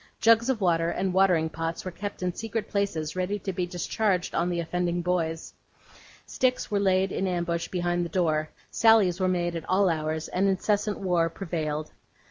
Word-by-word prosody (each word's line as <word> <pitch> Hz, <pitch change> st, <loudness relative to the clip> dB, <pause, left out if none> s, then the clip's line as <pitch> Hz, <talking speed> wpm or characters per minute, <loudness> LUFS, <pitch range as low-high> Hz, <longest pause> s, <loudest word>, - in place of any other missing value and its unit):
Jugs 230 Hz, +2 st, +4 dB
of 245 Hz, -5 st, 0 dB
water, 170 Hz, -2 st, +2 dB
and 185 Hz, +1 st, -1 dB
watering 180 Hz, -4 st, +3 dB
pots, 165 Hz, +2 st, -4 dB
were 185 Hz, -, -3 dB
kept 200 Hz, +1 st, -6 dB
in 180 Hz, -1 st, -1 dB
secret 225 Hz, +1 st, -4 dB
places 190 Hz, -7 st, -1 dB
ready 185 Hz, +3 st, -1 dB
to 195 Hz, -1 st, -4 dB
be 180 Hz, 0 st, -2 dB
discharged 180 Hz, +2 st, -1 dB
on 175 Hz, +1 st, +1 dB
the 175 Hz, -1 st, -1 dB
offending 175 Hz, +1 st, -1 dB
boys; 165 Hz, -2 st, -2 dB, 0.7 s
sticks 255 Hz, -3 st, 0 dB
were 205 Hz, -, +2 dB
laid 190 Hz, -1 st, +2 dB
in 190 Hz, -, -1 dB
ambush 170 Hz, -2 st, -1 dB
behind 175 Hz, -1 st, -1 dB
the 170 Hz, -, -4 dB
door; 155 Hz, -3 st, 0 dB, 0.2 s
sallies 215 Hz, -6 st, +4 dB
were 185 Hz, -, +2 dB
made 175 Hz, -2 st, 0 dB
at 160 Hz, -1 st, -6 dB
all 190 Hz, 0 st, +3 dB
hours; 155 Hz, -1 st, -2 dB
and 190 Hz, +2 st, +1 dB
incessant 205 Hz, +2 st, 0 dB
war 175 Hz, -3 st, +1 dB
prevailed. 155 Hz, -4 st, -4 dB
180 Hz, 180 wpm, -27 LUFS, 170-195 Hz, 0.7 s, Jugs